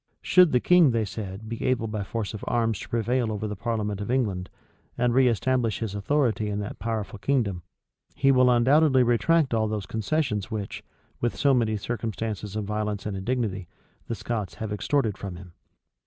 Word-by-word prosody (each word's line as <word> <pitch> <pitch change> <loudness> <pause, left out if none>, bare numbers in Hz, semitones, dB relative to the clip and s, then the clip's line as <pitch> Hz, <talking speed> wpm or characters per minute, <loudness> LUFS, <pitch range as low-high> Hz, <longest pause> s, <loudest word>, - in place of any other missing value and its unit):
Should 180 -3 +5
the 125 - +4
king, 175 +1 +5
they 115 -3 +1
said, 100 0 -6
be 115 0 -5
able 125 -3 +1
by 105 -1 -3
force 110 +1 -4
of 105 - -7
arms 115 -3 +1
to - - -9
prevail 120 0 0
over 110 0 -3
the 105 - -4
parliament 105 -1 -2
of 105 - -5
England, 105 -8 0 0.5
and 120 0 +2
reestablish 125 -3 +2
his 110 -4 -4
authority 110 0 0
in 100 - -2
that 100 - -6
powerful 110 -3 -3
kingdom, 105 -9 0 0.5
he 135 0 +4
will 130 -1 +5
undoubtedly 130 +3 +5
retract 130 +4 +2
all 110 -1 +2
those 105 -2 -3
concessions 110 0 -1
which, 105 -3 -5 0.4
with 120 - -1
so 140 -1 +3
many 110 -4 +1
circumstances 110 -2 -4
of 110 - -1
violence 105 -1 -3
and 105 -2 -3
indignity, 100 -3 -2 0.4
the 115 - -2
Scots 110 -4 -4
have 110 -1 -4
extorted 110 0 0
from 95 -3 -6
him. 90 -1 -12
110 Hz, 180 wpm, -26 LUFS, 105-125 Hz, 0.5 s, Should